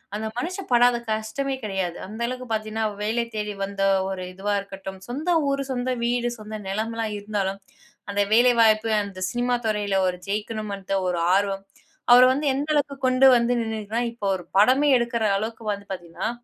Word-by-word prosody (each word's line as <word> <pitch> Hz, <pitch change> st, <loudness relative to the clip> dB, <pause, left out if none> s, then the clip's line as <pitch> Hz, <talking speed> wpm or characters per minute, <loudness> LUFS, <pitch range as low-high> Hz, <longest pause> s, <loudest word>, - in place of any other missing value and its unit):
அந்த 215 Hz, +1 st, -3 dB
மனுஷன் 365 Hz, +6 st, -4 dB
படாத 245 Hz, 0 st, +5 dB
கஷ்டமே 220 Hz, +6 st, -2 dB
கிடையாது. 190 Hz, -4 st, -2 dB
அந்த 220 Hz, +3 st, -8 dB
அளவுக்கு 255 Hz, 0 st, -5 dB
பார்த்தீங்கன்னா 220 Hz, 0 st, -2 dB, 0.2 s
வேலை 225 Hz, +3 st, 0 dB
தேடி 210 Hz, -1 st, -2 dB
வந்த 195 Hz, 0 st, -3 dB, 0.3 s
ஒரு 190 Hz, -1 st, -4 dB
இதுவா 200 Hz, +2 st, -2 dB
இருக்கட்டும், 195 Hz, -1 st, -9 dB
சொந்த 295 Hz, +9 st, -2 dB, 0.2 s
ஊரு, 275 Hz, 0 st, 0 dB
சொந்த 255 Hz, 0 st, -1 dB
வீடு, 240 Hz, 0 st, +1 dB
சொந்த 215 Hz, 0 st, -7 dB
நிலம் 215 Hz, +4 st, -2 dB
எல்லாம் 225 Hz, -2 st, -2 dB
இருந்தாலும் 200 Hz, -2 st, -2 dB, 0.5 s
அந்த 200 Hz, 0 st, +1 dB
வேலை 245 Hz, +2 st, +6 dB
வாய்ப்பு 220 Hz, 0 st, +4 dB
அந்த 195 Hz, -2 st, -8 dB
சினிமா 245 Hz, 0 st, 0 dB
துறையில 205 Hz, -2 st, 0 dB
ஒரு 180 Hz, 0 st, -1 dB
ஜெயிக்கணும்ன்ற 205 Hz, -2 st, -3 dB
ஒரு 175 Hz, -1 st, 0 dB, 0.2 s
ஆர்வம், 195 Hz, -1 st, 0 dB, 0.5 s
அவர 245 Hz, +1 st, +9 dB
வந்து 290 Hz, +3 st, -2 dB
எந்த 285 Hz, +2 st, -2 dB
அளவுக்கு 285 Hz, -1 st, 0 dB
கொண்டு 255 Hz, +1 st, +4 dB
வந்து 235 Hz, +1 st, +1 dB
நின்னுரக்குனா, 220 Hz, +1 st, -2 dB
இப்போ 220 Hz, -3 st, -7 dB
ஒரு 180 Hz, -, -7 dB, 0.2 s
படமே 260 Hz, +7 st, +5 dB
எடுக்கற 235 Hz, -1 st, -1 dB
அளவுக்கு 220 Hz, +2 st, -5 dB
வந்து 200 Hz, 0 st, -9 dB
பார்த்தீங்கன்னா 175 Hz, +3 st, -4 dB
220 Hz, 170 wpm, -24 LUFS, 200-245 Hz, 0.5 s, அவர